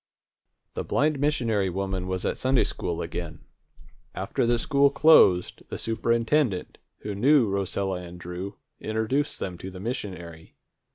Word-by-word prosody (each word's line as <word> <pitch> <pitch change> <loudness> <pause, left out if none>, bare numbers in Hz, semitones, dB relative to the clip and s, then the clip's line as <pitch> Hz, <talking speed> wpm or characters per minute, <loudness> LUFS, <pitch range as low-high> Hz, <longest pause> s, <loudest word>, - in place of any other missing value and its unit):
The - - -3
blind 150 0 +1
missionary 115 -9 +1
woman 95 0 -3
was 95 -1 -2
at - - 0
Sunday 130 0 +2
school 85 -2 -3
again. 80 -2 -6 0.7
After - - -1
the 120 0 +3
school 140 +4 +3
closed, 115 - +5
the - - -4
superintendent, 115 -1 0 0.2
who 105 - -4
knew 130 +4 +4
Rosella 95 -1 -2
and 90 0 -10
Drew, 90 +3 -6 0.2
introduced 110 +7 -1
them 90 -3 -5
to 95 - -6
the 95 -1 -10
missionary. 90 -8 -6
100 Hz, 135 wpm, -26 LUFS, 90-125 Hz, 0.7 s, closed